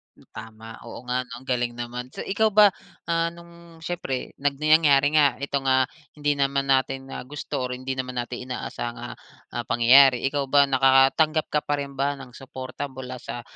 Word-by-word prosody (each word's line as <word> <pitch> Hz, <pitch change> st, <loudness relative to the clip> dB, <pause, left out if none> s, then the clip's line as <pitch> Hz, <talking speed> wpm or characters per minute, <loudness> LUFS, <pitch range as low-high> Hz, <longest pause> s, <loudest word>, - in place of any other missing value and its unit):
Hmm. -, -, -21 dB
Tama, 110 Hz, 0 st, -10 dB
oo -, -, -9 dB
nga, 125 Hz, 0 st, -1 dB
'no? 125 Hz, -, -14 dB
Ang -, -, -20 dB
galing 120 Hz, -1 st, 0 dB
naman. 120 Hz, +1 st, -6 dB
So, -, -, -5 dB
ikaw 220 Hz, +3 st, +1 dB
ba, 210 Hz, -1 st, +7 dB, 0.4 s
ah, 165 Hz, 0 st, +1 dB
nung 170 Hz, -1 st, -16 dB
siyempre, 160 Hz, -7 st, -4 dB
nag 145 Hz, 0 st, 0 dB
nangyari 150 Hz, -2 st, +5 dB
nga 150 Hz, -2 st, +5 dB
itong, 140 Hz, -1 st, -2 dB
ah, 130 Hz, -1 st, +3 dB, 0.3 s
hindi 145 Hz, -1 st, -1 dB
naman 140 Hz, 0 st, 0 dB
natin 135 Hz, 0 st, 0 dB
na -, -, -7 dB
gusto 145 Hz, +1 st, -5 dB
or 125 Hz, -, -4 dB
hindi 130 Hz, +1 st, -5 dB
naman 125 Hz, 0 st, -4 dB
natin 125 Hz, +1 st, -7 dB
inaasahang, 120 Hz, -1 st, -5 dB
ah 120 Hz, -, -7 dB, 0.4 s
ah 120 Hz, -, -4 dB
pangyayari. 125 Hz, +2 st, +6 dB
Ikaw 140 Hz, -1 st, -1 dB
ba 140 Hz, 0 st, +4 dB
nakakatanggap 135 Hz, +4 st, +4 dB
ka 150 Hz, -, +1 dB
pa 145 Hz, -, 0 dB
rin 140 Hz, -1 st, -10 dB
ba 140 Hz, +1 st, +1 dB
ng 135 Hz, -3 st, -11 dB
suporta 130 Hz, +2 st, -7 dB
mula 130 Hz, -1 st, -8 dB
sa 120 Hz, 0 st, -7 dB
135 Hz, 190 wpm, -24 LUFS, 125-145 Hz, 0.4 s, ba